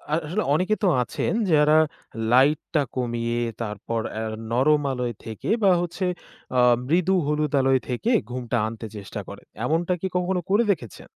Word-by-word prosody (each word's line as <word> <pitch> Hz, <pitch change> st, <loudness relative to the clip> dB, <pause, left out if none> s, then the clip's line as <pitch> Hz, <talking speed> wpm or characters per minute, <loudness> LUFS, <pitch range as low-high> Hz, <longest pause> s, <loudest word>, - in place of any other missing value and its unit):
আসলে 170 Hz, +6 st, -1 dB
অনেকে 185 Hz, +7 st, +2 dB
তো -, -, +4 dB, 0.2 s
আছেন -, -, -2 dB, 0.2 s
যারা 150 Hz, +1 st, +5 dB, 0.5 s
লাইটটা 145 Hz, +3 st, +3 dB
কমিয়ে 120 Hz, -1 st, -1 dB, 0.2 s
তারপর 110 Hz, +1 st, -3 dB, 0.2 s
আ -, -, -2 dB, 0.3 s
নরম 145 Hz, +5 st, +3 dB
আলোয় 125 Hz, -2 st, -2 dB
থেকে 110 Hz, -1 st, -6 dB
বা 195 Hz, -, +6 dB
হচ্ছে 175 Hz, +2 st, -3 dB, 0.5 s
আ -, -, +5 dB, 0.3 s
মৃদু 180 Hz, +4 st, +2 dB
হলুদ 150 Hz, -1 st, 0 dB
আলোয় 135 Hz, 0 st, +3 dB
থেকে 125 Hz, -, -1 dB, 0.2 s
ঘুমটা 125 Hz, -1 st, -2 dB
আনতে 115 Hz, 0 st, -7 dB
চেষ্টা 100 Hz, -2 st, -7 dB
করে, -, -, -9 dB, 0.2 s
এমনটা 170 Hz, +5 st, +1 dB
কি 190 Hz, -, -1 dB
কখনো 180 Hz, 0 st, 0 dB
করে 205 Hz, +4 st, +4 dB
দেখেছেন? 120 Hz, -, -11 dB
150 Hz, 150 wpm, -24 LUFS, 120-175 Hz, 0.5 s, বা